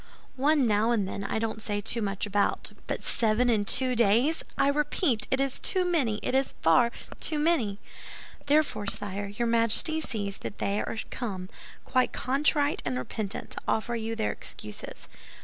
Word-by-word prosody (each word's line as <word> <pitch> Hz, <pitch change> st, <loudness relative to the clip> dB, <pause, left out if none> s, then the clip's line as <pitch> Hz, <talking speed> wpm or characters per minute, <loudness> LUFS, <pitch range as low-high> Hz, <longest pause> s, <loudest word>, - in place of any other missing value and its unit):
One 285 Hz, +1 st, +3 dB
now 215 Hz, 0 st, +2 dB
and 215 Hz, -5 st, +1 dB
then 200 Hz, +1 st, -5 dB
I 200 Hz, -, -2 dB
don't 220 Hz, 0 st, -2 dB
say 205 Hz, -1 st, -3 dB, 0.2 s
much 200 Hz, -1 st, -2 dB
about; 205 Hz, 0 st, 0 dB, 0.2 s
but -, -, -3 dB
seven 235 Hz, +2 st, +2 dB
in 210 Hz, -3 st, +1 dB
two 255 Hz, +4 st, +3 dB
days, 235 Hz, +8 st, +3 dB, 0.2 s
I -, -, +3 dB
repeat, 285 Hz, -, +1 dB
it 265 Hz, -, +1 dB
is 275 Hz, -1 st, 0 dB
too 370 Hz, -2 st, +2 dB
many, 270 Hz, -12 st, +1 dB
it -, -, -1 dB
is 270 Hz, +1 st, +1 dB
far 200 Hz, +9 st, +5 dB, 0.3 s
too 310 Hz, -, +2 dB
many!" 295 Hz, -11 st, +1 dB, 0.7 s
"Therefore, 285 Hz, -8 st, +2 dB
sire, 205 Hz, 0 st, -2 dB
your 215 Hz, +4 st, -2 dB
Majesty 230 Hz, +8 st, +2 dB
sees 205 Hz, -8 st, -4 dB
that -, -, -6 dB
they 200 Hz, +1 st, 0 dB
are -, -, -4 dB
come, 190 Hz, -7 st, -4 dB, 0.4 s
quite 255 Hz, 0 st, +1 dB
contrite 285 Hz, +2 st, +1 dB
and 130 Hz, -2 st, -2 dB
repentant, 200 Hz, -, -4 dB
to -, -, -1 dB
offer 235 Hz, +2 st, 0 dB
you 225 Hz, 0 st, -3 dB
their 220 Hz, -, 0 dB
excuses." 105 Hz, -1 st, -8 dB
230 Hz, 165 wpm, -28 LUFS, 205-275 Hz, 0.7 s, far